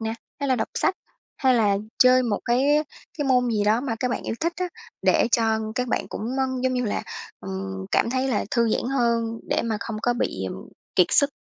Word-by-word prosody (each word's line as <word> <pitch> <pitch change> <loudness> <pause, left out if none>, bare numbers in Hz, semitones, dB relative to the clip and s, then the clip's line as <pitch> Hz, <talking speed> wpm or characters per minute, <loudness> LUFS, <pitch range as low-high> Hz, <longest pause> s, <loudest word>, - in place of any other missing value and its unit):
nè, 225 0 -2 0.3
hay 280 - -1
là 260 - +3
đọc 220 - -1
sách, 380 - +1 0.4
hay 260 -2 +3
là 210 -4 +3 0.2
chơi 255 0 +6
một 215 -4 0
cái 240 +2 +2 0.6
cái 290 - 0
môn 250 -2 +3
gì 210 -2 +1
đó 220 +3 +3
mà 255 -4 -2
các 250 -1 0
bạn - - -2
yêu - - -3
thích 335 +1 +1
á, 365 0 -2 0.3
để - - +3
cho 220 -1 +1 0.2
các 250 -1 -1
bạn - - -1
cũng, - - -6 0.2
ơ, 265 - +3 0.2
giống 260 0 +1
như 250 -1 0
là, 205 - -1 0.4
ừm, 95 0 -5
cảm 230 - +3
thấy 260 +1 0
là 225 - 0
thư 235 -2 +2
giãn - - 0
hơn, 230 -1 +1
để - - +1
mà 225 -2 -1
không 225 -2 -4
có 245 - +3
bị, - - -2
ừm, - - -8 0.3
kiệt - - +6
sức. 285 0 +4
235 Hz, 230 wpm, -24 LUFS, 220-255 Hz, 0.6 s, chơi